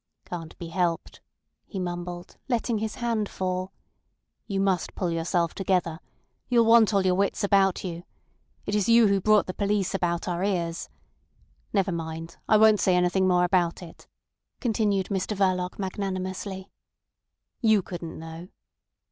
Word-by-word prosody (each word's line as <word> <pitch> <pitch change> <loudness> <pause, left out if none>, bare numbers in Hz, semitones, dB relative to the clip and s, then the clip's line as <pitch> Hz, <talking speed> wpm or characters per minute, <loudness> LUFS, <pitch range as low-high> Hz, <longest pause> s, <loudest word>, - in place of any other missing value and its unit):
"Can't 165 -2 -7
be 170 - -7
helped," 170 -1 -2 0.5
he - - -7
mumbled, 175 0 -5
letting 235 -2 0
his 220 0 -3
hand 230 -4 -1
fall. 185 0 -3 0.8
"You 195 -2 -2
must 195 -2 0
pull 180 -3 -1
yourself 170 0 0
together. 180 -4 0 0.5
You'll 235 -2 +4
want 225 -1 +6
all 195 -2 +2
your 185 - +4
wits 195 +2 0
about 195 -2 +3
you. 175 -2 -5 0.6
It 205 - -3
is 210 0 +1
you 230 0 +7
who 195 -1 +2
brought 215 +1 +4
the 185 - -5
police 200 -1 0
about 175 -2 -1
our 175 0 -1
ears. 170 -4 -2 0.8
Never 195 -2 +1
mind, 165 0 -5
I 215 - +6
won't 215 -1 +6
say 185 0 +3
anything 180 +1 +2
more 180 -1 +3
about 180 -1 +1
it," 165 - -13 0.5
continued 210 -5 0
Mr 200 +1 -2
Verloc 185 -2 0
magnanimously. 190 0 -4 0.9
"You 220 -4 +4
couldn't 170 -3 -7
know." 165 +2 -9
185 Hz, 150 wpm, -26 LUFS, 175-205 Hz, 0.9 s, you